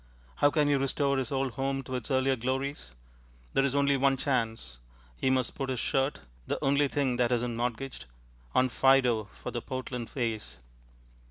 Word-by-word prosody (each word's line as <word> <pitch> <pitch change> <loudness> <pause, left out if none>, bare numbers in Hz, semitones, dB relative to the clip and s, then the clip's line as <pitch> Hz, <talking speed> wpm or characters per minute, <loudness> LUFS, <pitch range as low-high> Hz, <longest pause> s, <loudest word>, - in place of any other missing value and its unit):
How 145 - +5
can 150 0 +2
he 145 - +3
restore 140 0 +1
his 130 +2 -3
old 135 -1 0
home 135 +2 -2
to 130 - -7
its 125 -3 -3
earlier 130 0 +2
glories? 130 - -3 0.6
There 135 - +3
is 140 0 +1
only 140 0 +3
one 135 0 +3
chance. 115 - -2 0.4
He 130 - 0
must 130 -2 +1
put 135 -2 -4
his 130 -2 -1
shirt 135 +4 0 0.3
(the - - -1
only 140 +1 +3
thing 135 -3 0
that 120 0 +2
isn't 120 -1 0
mortgaged) 120 - -3 0.5
on 130 0 +4
Fido 125 -3 +4
for - - -8
the 120 - -3
Portland 125 -3 -5
Vase. 115 - -3
130 Hz, 175 wpm, -29 LUFS, 120-135 Hz, 0.6 s, How